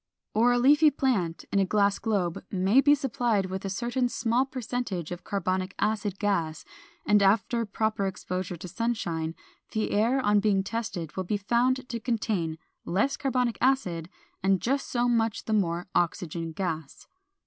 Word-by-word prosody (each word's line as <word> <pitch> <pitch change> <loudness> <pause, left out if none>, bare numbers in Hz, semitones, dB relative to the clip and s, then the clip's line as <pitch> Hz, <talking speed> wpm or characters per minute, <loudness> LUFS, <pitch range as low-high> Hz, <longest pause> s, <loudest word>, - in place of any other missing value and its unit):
Or 235 +3 +4
a 245 - +3
leafy 295 +5 +6
plant 230 - -1
in 200 - +2
a - - +4
glass 200 +1 +2
globe 195 -7 -1
may 195 +7 +4
be 290 +1 +5
supplied 240 -7 0
with 190 +1 -4
a - - -2
certain 240 +5 -1
small 240 +3 +1
percentage 245 - -4
of 175 0 -6
carbonic 185 -1 -2
acid 205 -2 -1
gas, 170 -7 -1 0.4
and 210 -1 +4
after 225 +3 +2
proper 215 -1 0
exposure 185 -1 -4
to 175 - -8
sunshine, 170 -7 -2 0.4
the 215 -1 -1
air 230 +6 +2
on 205 -4 +3
being 200 -2 +2
tested 200 -7 -4
will 190 - -2
be 205 +3 0
found 245 +5 +1
to 235 - -4
contain 210 -9 -1 0.3
less 205 +10 +1
carbonic 250 -4 0
acid 180 -11 +1 0.3
and 190 0 +3
just 270 +7 -1
so 240 0 +1
much 225 -2 +1
the 220 - -1
more 175 -4 +1
oxygen 165 -1 -1
gas. 160 -4 -4
205 Hz, 160 wpm, -27 LUFS, 185-240 Hz, 0.4 s, leafy